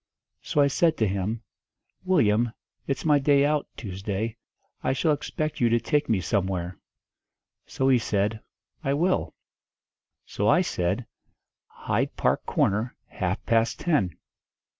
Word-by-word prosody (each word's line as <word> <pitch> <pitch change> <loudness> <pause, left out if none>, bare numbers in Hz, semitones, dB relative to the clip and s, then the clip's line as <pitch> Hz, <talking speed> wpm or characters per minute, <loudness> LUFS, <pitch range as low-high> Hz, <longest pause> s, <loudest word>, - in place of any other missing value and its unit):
So 145 - +1
I - - +6
said 160 +3 +2
to 110 - +2
him, 100 +4 -2 0.6
'Willyum, 120 - +2 0.3
it's 135 +1 -2
my 150 -2 +5
day 140 0 +4
out, 150 0 +1
Tuesday. 105 +2 -4 0.5
I - - +1
shall 150 +4 +2
expect 155 0 -3
you 120 - +4
to 115 +1 +3
take 150 +4 0
me 105 -5 +2
somewhere.' 90 0 -1 0.9
So 135 - -1
he 130 -2 +5
said, 105 0 0 0.4
'I 140 -1 +1
will.' 180 +5 0 0.9
So 105 - -2
I 175 - +5
said, 90 - -1 0.6
'Hyde - - -2
Park - - 0
Corner, 110 +5 +1
half 95 +2 -3
past 115 0 +2
ten.' 110 - +1
115 Hz, 135 wpm, -26 LUFS, 100-145 Hz, 0.9 s, I